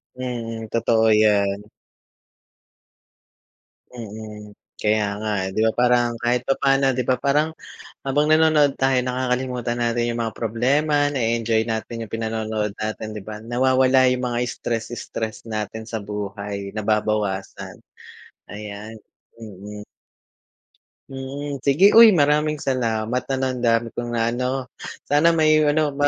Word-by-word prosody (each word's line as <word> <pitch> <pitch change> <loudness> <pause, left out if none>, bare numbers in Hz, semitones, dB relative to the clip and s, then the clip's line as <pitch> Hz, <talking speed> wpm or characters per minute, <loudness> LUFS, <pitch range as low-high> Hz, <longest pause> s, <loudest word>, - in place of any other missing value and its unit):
Mhm, 115 -3 -5
totoo 115 -1 +2
'yan. 105 -2 +3 2.3
Mm, 105 -3 -9 0.2
kaya 105 0 +1
nga 110 0 -2 0.2
eh, - - -3
di - - -1
ba 110 - +3
parang, 120 -1 +2
kahit 120 +1 +1
papano, 135 0 +2
di 125 - 0
ba, 130 - +3
parang 145 +3 +2 0.6
habang 145 +2 +1
nanonood 155 -3 +4
tayo, 135 -1 +2
nakakalimutan 125 -1 -2
natin 120 0 0
yung 115 - -4
mga 115 -1 -4
problema, 145 +6 +1
nae-enjoy 115 -4 0
natin 115 +1 -4
yung - - -23
pinanonood 110 -2 -2
natin, 110 0 -4
di 105 - -6
ba? 105 +1 -7
Nawawala 130 +2 +3
yung 125 - -4
mga 120 -1 -2
stress-stress 115 -1 -5
natin 110 +1 -4
sa 110 0 -4
buhay, 100 -1 -5
nababawasan, 105 -2 -2 0.7
ayan. 105 +1 -8 0.4
Mm. 105 -1 -9 1.3
Mm, 140 +1 -6
sige 145 +10 +4
uy, 225 -5 +9
maraming 150 +1 +2
salamat 120 -2 -1
ano. 135 -1 -1
Ang 125 - -5
dami 115 -1 +2
kong 120 0 -4
naano, 125 +3 -1 0.3
sana 165 +3 +3
may 155 -1 +4
ano 150 0 +2
ma 145 +1 +1
120 Hz, 125 wpm, -22 LUFS, 110-135 Hz, 2.3 s, uy